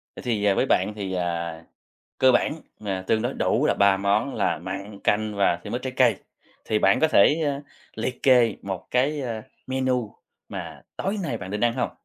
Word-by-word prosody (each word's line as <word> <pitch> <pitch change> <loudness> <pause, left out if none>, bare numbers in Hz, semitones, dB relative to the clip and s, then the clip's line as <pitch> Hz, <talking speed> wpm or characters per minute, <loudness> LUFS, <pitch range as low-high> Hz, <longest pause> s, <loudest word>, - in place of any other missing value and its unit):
Vậy - - -9
thì, 110 -4 0
ờ, 100 -1 +4
với - - +2
bạn 95 +3 +1
thì, 100 -3 -4
à, 85 -2 -3 0.6
cơ 130 0 +6
bản 120 - +2 0.3
mà 95 -3 -3
tương 110 -1 +2
đối - - -2
đủ - - +1
là - - +2
3 100 -1 +4
món 100 +7 0
là - - 0
mặn, 95 +4 -6
canh 105 0 +1
và 100 -3 +2
thêm - - -5
ít 125 - -3
trái 130 0 -4
cây, 120 -6 +4 0.5
thì 110 - +1
bạn 100 -1 +3
có 160 - +4
thể, 155 +1 +5
ơ, 140 -1 -1 0.3
liệt 125 +3 -4
kê 125 -5 +5
một 95 -2 -5
cái, 140 +4 +1
ơ, 115 -4 -4 0.2
menu 130 -4 -1 0.3
mà - - -7
tối 195 +3 -2
nay 140 -9 -2
bạn 95 -2 -7
định 105 +1 -3
ăn 120 - +3
hông? 125 - -1
110 Hz, 210 wpm, -24 LUFS, 100-130 Hz, 0.6 s, cơ